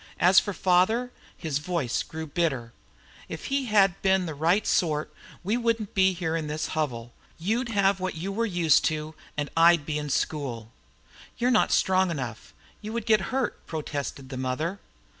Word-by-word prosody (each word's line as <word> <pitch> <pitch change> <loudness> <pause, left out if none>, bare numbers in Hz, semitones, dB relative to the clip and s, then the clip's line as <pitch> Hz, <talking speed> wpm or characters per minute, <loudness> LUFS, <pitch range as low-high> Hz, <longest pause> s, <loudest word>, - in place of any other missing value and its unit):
As 180 +2 +7
for 205 - -3
father," 195 +7 +2 0.3
his 155 -5 -2
voice 155 -6 -1
grew 160 0 -6
bitter, 140 -8 -2 0.6
"if - - -6
he'd 215 -9 +3
been 190 -1 +3
the 160 - -4
right 170 +8 +2
sort 155 -4 0 0.3
we 210 +6 0
wouldn't 230 -3 -1
be 190 -1 +4
here 165 -2 -2
in 160 -2 -2
this 150 +1 -3
hovel. 120 -7 -3 0.2
You'd 225 +8 -1
have 200 -2 +2
what 185 -1 -3
you 180 +5 -4
were 230 +4 0
once 190 - -7
used 165 -4 +4
to, 155 0 -2 0.2
and 145 -1 -2
I'd 165 -2 +5
be 150 -1 -2
in 150 0 -5
school." 125 -6 -2 0.7
"You're 245 +1 +2
not 230 - +3
strong 190 0 +3
enough; 130 -8 -5 0.3
you 215 0 -6
would 235 -2 -3
get 215 -3 +4
hurt," 260 -1 -2
protested 145 -4 -5
the 130 - -6
mother. 150 +9 -2
170 Hz, 175 wpm, -26 LUFS, 150-195 Hz, 0.7 s, As